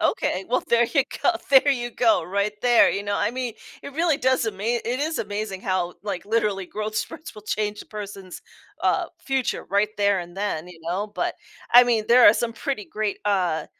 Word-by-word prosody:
Okay. 185 - 0
Well, 250 +2 +1
there 235 0 +4
you 280 - +5 0.2
go, - - +6 0.2
there 275 +1 +6
you 240 -2 -3
go, 230 -1 +2
right 200 +2 -1
there. 240 -2 +6
You 200 - -2
know, 205 0 -2
I 210 - +1
mean, 250 -3 -3 0.3
it 280 - -8
really 325 -1 +2
does 260 -3 +1
ama 200 -2 -4
it 240 +3 -1
is 315 +2 -1
amazing 205 -2 -4
how, 185 -2 -1
like, 195 -4 -4
literally 210 -3 0
growth 215 +3 -5
spurts 320 +9 -5
will 210 - -11
change 210 0 -2
a - - -20
person's, 200 -3 -8 0.4
uh, - - +1
future 265 -3 -1
right 200 +2 +2
there 200 -2 +2
and 175 +1 -10
then, 185 -4 -3
you 170 -2 -13
know, 185 +6 -2
but, - - -2 0.4
I 245 - +10
mean, 235 -3 +1
there 245 +1 +7
are 210 - +6
some 235 -1 -1
pretty 230 -2 -4
great, 215 -2 -3
uh, 180 -6 0
210 Hz, 205 wpm, -24 LUFS, 200-240 Hz, 0.4 s, I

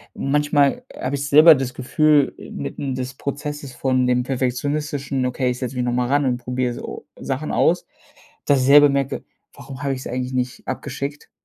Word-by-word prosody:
manchmal 145 - +1
habe 130 +2 -3
ich 140 0 -3
selber 155 +3 +9
das 130 -1 -3
Gefühl 145 +2 +2 0.2
mitten 135 -2 -4
des 130 0 -4
Prozesses 140 0 -5
von 130 0 +1
dem 125 0 +2
Perfektionistischen: 135 +2 -2
„Okay, 125 0 0
ich 125 - -5
setze 130 0 -4
mich 125 - -1
noch 120 - 0
mal 125 0 0
ran 145 +2 +2
und 125 -2 +1
probiere 125 0 -2
so - - -8
Sachen - - -3
aus“, - - +2 0.6
dass 140 -2 +3
ich - - +1
selber 145 +2 +8
merke: 140 -1 -1 0.3
„Warum 135 +1 -10
habe 140 -1 0
ich 130 - -5
es - - -7
eigentlich 125 +1 -3
nicht 125 -1 -3
abgeschickt“ 140 +2 -5
135 Hz, 185 wpm, -21 LUFS, 125-145 Hz, 0.6 s, selber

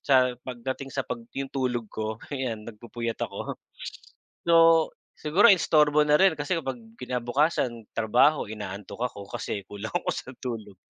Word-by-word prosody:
sa 130 -2 +4
pagdating 130 +2 -4
sa 135 - -1
pag 235 - -4 0.2
'yong 135 -1 -4
tulog 125 -3 -1
ko 110 0 -3 0.2
'yan 125 -6 -3
nagpupuyat 115 +1 -5
ako. - - -6 0.9
So, 170 - +6 0.6
siguro 175 +9 +5
istorbo 150 -4 +4
na 150 0 +5
rin 190 -3 +6
kasi 145 +3 -2
kapag 135 -5 -4 0.2
kinabukasan 125 -1 0
trabaho, 115 +7 +4
inaantok 105 +3 -5
ako 100 0 -10
kasi 100 - -3
kulang 105 +2 -6
ako - - 0
sa - - -6
tulog 110 -5 -5
125 Hz, 145 wpm, -27 LUFS, 110-145 Hz, 0.9 s, So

